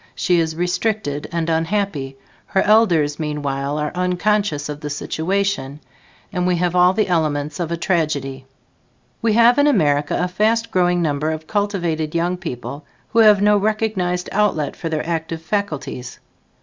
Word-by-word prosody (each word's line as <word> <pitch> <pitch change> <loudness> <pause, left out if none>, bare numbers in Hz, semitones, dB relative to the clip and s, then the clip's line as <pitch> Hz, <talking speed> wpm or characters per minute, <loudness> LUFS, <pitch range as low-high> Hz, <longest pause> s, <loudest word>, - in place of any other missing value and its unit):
She 175 -1 +2
is 160 -1 -1
restricted 180 -3 -1
and 170 -1 -1
unhappy; 165 -5 -1 0.3
her 190 - +1
elders 170 -9 +3
meanwhile, 145 -2 -2
are 150 0 -2
unconscious 180 -3 0
of 150 -1 -6
the 150 - -5
situation 160 -1 -2 0.5
and 180 -1 0
we 180 - +2
have 175 0 0
all 180 +1 +5
the 215 +2 +1
elements 155 -4 -1
of 170 -2 -2
a 170 - -1
tragedy. 145 -7 -1 0.7
We 225 -2 +2
have 235 +4 +5
in 285 - +5
America 145 - +2
a 180 - +1
fast 220 +5 0
growing 180 -1 +2
number 150 0 0
of 155 0 -4
cultivated 175 -6 -1
young 175 +2 +1
people 145 -4 -6 0.3
who 230 - +1
have 210 -3 +6
no 210 0 +5
recognized 200 -4 -1
outlet 195 -8 0
for 165 - -5
their 155 0 -2
active 165 -1 -3
faculties. 155 -9 -4
170 Hz, 155 wpm, -20 LUFS, 150-200 Hz, 0.7 s, have